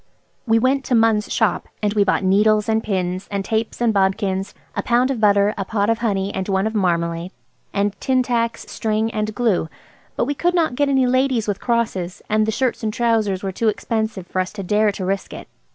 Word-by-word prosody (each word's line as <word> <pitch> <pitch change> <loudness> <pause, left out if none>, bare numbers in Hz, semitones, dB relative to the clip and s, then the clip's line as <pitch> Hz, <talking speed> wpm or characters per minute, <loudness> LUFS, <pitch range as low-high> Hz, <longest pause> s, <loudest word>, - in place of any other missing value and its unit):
We 225 0 +4
went 265 +3 +2
to 250 - +1
Munn's 225 -2 +2
shop, - - +1 0.2
and 205 -1 +1
we 210 -2 +3
bought 200 - +1
needles 210 +3 +3
and 220 0 +2
pins, 185 -2 -2
and 200 -1 -3
tapes 220 +1 -2
and 235 -2 +2
bodkins, 195 0 0 0.2
a - - 0
pound 245 +2 +2
of 240 -5 -3
butter, 205 0 +4
a - - 0
pot 205 +1 0
of 225 - -1
honey 200 -4 -1
and 190 +1 -3
one 190 0 +1
of 220 - -1
marmalade, 170 -3 0 0.4
and 200 0 0
tin 260 -2 +2
tacks, 230 -2 -1
string, 220 0 -1
and 215 -1 -3
glue. 205 -8 +1 0.5
But - - 0
we 285 - -1
could 350 +5 0
not 325 -6 +2
get 285 +3 +1
any 265 -2 +3
ladies 255 -3 +1
with 205 -2 -2
crosses, 215 -6 -1
and 215 0 +2
the - - +1
shirts 255 +2 -1
and 220 -2 -1
trousers 220 -4 0
were 195 - -2
too 225 +4 -1
expensive 220 -2 -1
for 185 - -3
us 185 - -4
to 200 -2 -6
dare 210 +3 +2
to 195 -2 -5
risk 195 0 -2
it. - - -9
215 Hz, 215 wpm, -21 LUFS, 195-230 Hz, 0.5 s, We